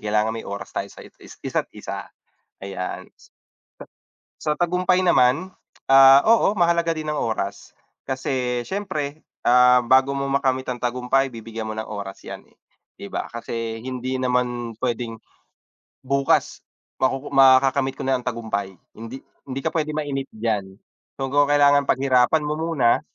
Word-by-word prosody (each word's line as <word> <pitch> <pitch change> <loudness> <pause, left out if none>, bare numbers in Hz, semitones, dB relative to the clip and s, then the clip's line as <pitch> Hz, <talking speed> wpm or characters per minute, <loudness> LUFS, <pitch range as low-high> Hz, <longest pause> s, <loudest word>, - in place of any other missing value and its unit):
kailangan 105 +1 0
may 115 - -7
oras 100 0 -7
tayo - - -3
sa - - -13
it - - -16
is - - -14
isa't - - -2
isa. - - -7 0.5
Ayan. 95 -2 -5
Huh. - - -23 1.1
Sa 150 - -1
tagumpay 180 +2 +1
naman, 175 +2 +3 0.4
ah, 135 +1 +9
oo, 220 -2 +4
mahalaga 170 -2 +2
din 155 -1 -4
ang 150 - -2
oras. 105 -3 -4 0.3
Kasi 130 -2 -2
siyempre, 155 -5 -4 0.2
ah, 125 0 +5
bago 130 +3 +3
mo 140 - -2
makamit 130 -2 0
ang 125 - -6
tagumpay 125 +2 0
bibigyan 115 -1 -7
mo - - -3
ng 110 - -3
oras 100 -2 -7
yan, - - -8
eh, - - -29 0.4
'di 100 - -7
ba? - - -3
Kasi 115 -1 -5
hindi 130 0 -4
naman 125 -2 -1
pwedeng 120 -2 -3 0.9
bukas 140 +1 +1 0.4
makuku 135 +2 -1
makakamit 135 0 +4
ko - - -6
na 130 0 +2
ang - - -17
tagumpay. 100 -5 -3 0.2
Hindi 115 +4 -9 0.2
hindi 135 +1 -4
ka - - 0
pwede 155 -2 -1
mainip 140 -3 -3
diyan. 105 -4 -3 0.4
So, 135 - -1
kung 145 0 +4
kailangan 145 -1 +4
paghirapan 130 +3 +3
mo 150 +1 -2
muna, 160 -8 +2
130 Hz, 155 wpm, -22 LUFS, 115-140 Hz, 1.1 s, ah